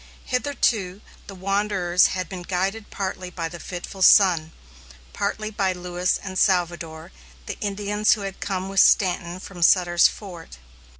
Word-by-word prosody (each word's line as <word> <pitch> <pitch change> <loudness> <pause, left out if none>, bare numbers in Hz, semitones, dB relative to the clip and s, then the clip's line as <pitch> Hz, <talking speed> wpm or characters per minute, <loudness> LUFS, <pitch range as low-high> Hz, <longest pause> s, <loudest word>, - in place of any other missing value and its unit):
Hitherto, 230 -8 -1 0.3
the 195 - -9
wanderers 195 -2 +1
had 185 -2 -4
been 185 -1 -7
guided 195 +4 -3
partly 185 -2 -5
by 170 -2 -4
the 170 +1 -9
fitful 180 +3 -8
sun, 180 -5 +5 0.6
partly 215 +1 -3
by 195 -3 0
Lewis 180 0 -1
and 185 -1 -4
Salvador, 170 -3 0 0.3
the - - -6
Indians 205 +1 +1
who 215 - -4
had 195 -1 -6
come 190 -1 -3
with 195 0 0
Stanton 180 -3 +3
from 185 -2 -10
Sutter's 175 0 +5
Fort. 175 - -10
185 Hz, 140 wpm, -23 LUFS, 175-200 Hz, 0.6 s, sun